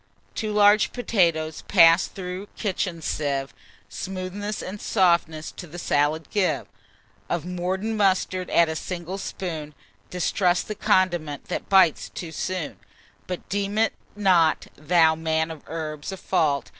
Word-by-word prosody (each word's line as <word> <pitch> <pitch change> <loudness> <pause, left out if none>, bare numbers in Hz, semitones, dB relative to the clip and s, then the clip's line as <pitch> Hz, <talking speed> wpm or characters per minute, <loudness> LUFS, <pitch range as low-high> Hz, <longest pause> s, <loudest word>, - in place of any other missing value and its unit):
"Two 215 -1 -3
large 210 0 +5
potatoes, 170 -10 +1
pass'd 165 -2 +5
through 185 +1 -5
kitchen 180 -5 -2
sieve, 140 -3 -2 0.3
Smoothness 195 +2 -5
and 200 +2 -7
softness 170 -5 +1
to 180 - -9
the 170 +3 -10
salad 150 -1 0
give: 200 -3 +1 0.6
Of 170 -2 -1
mordent 185 +5 -2
mustard 185 -2 +1
add 170 - +4
a 160 - -3
single 180 +3 -5
spoon, 160 -7 -5 0.3
Distrust 180 0 +1
the 215 - -3
condiment 175 -8 0
that - - -4
bites 190 -5 +4
too 170 -3 -7
soon; 170 0 -4 0.5
But 180 -1 -5
deem 200 +1 -2
it 220 -1 +3 0.2
not, 180 -6 +3
thou 160 +1 +4
man 160 0 -1
of 160 -3 -9
herbs, 155 0 -5
a 190 - -6
fault. 155 -7 0
180 Hz, 135 wpm, -24 LUFS, 160-195 Hz, 0.6 s, large